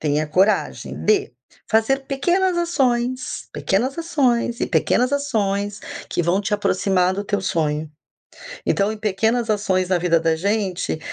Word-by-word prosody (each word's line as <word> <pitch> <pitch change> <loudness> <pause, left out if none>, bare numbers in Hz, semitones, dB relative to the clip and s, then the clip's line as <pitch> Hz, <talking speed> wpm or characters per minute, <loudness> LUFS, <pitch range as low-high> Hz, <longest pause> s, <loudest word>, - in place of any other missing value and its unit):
Tenha 150 0 +1
a - - -8
coragem 190 +7 0
de 415 0 +2 0.4
fazer 225 +5 +2
pequenas 350 +7 +1
ações, 255 -7 -1
pequenas 245 +9 0
ações 255 -8 0
e - - +1
pequenas 250 +3 +1
ações, 205 -7 -1 0.3
que 175 - 0
vão 175 +4 +1
te 205 +1 -4
aproximar 185 -2 +1
do 200 +1 -4
teu 200 0 -1
sonho. 155 -4 -1 0.8
Então, 200 +1 +1
em 220 - -6
pequenas 220 +3 0
ações 190 -3 +1
na 185 - +3
vida 170 -1 +2
da 165 0 +1
gente, 190 -3 -1
210 Hz, 145 wpm, -21 LUFS, 185-255 Hz, 0.8 s, na